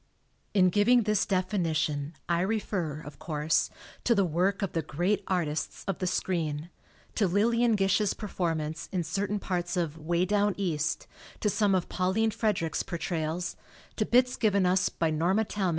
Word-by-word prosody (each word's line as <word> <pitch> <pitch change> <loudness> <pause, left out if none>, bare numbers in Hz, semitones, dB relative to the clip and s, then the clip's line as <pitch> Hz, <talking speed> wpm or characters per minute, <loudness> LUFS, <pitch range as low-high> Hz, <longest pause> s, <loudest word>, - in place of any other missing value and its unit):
In 185 -2 +6
giving 230 +5 +4
this 210 -1 +1
definition 160 -6 0
I 170 0 +1
refer, 185 -7 -1
of 145 -2 -11
course, 155 -1 0 0.3
to 235 - +3
the 200 -2 +3
work 180 +5 +1
of 195 - -1
the 165 - +1
great 175 +7 0
artists 165 -5 -2
of 195 - -2
the 185 - -1
screen 165 -3 -1 0.4
to 205 - +2
Lillian 230 +5 +3
Gish's 195 +1 +2
per 210 - -6
formance 160 -4 -2
in 180 -3 0
certain 195 +5 -1
parts 180 -2 -2
of 165 -2 -2
"Way 170 +3 +1
Down 205 +1 +2
East," 160 -6 -1 0.4
to 210 - +2
some 205 -2 +2
of 180 - 0
Pauline 195 +5 +1
Frederick's 200 -7 0
portrayals, 170 0 -3 0.4
to 215 - +1
bits 250 +1 +3
given 200 -4 +2
us 185 +1 +3
by 165 -1 -1
Norma 175 +8 +2
Talmad. 195 -3 -1
185 Hz, 165 wpm, -29 LUFS, 165-205 Hz, 0.4 s, In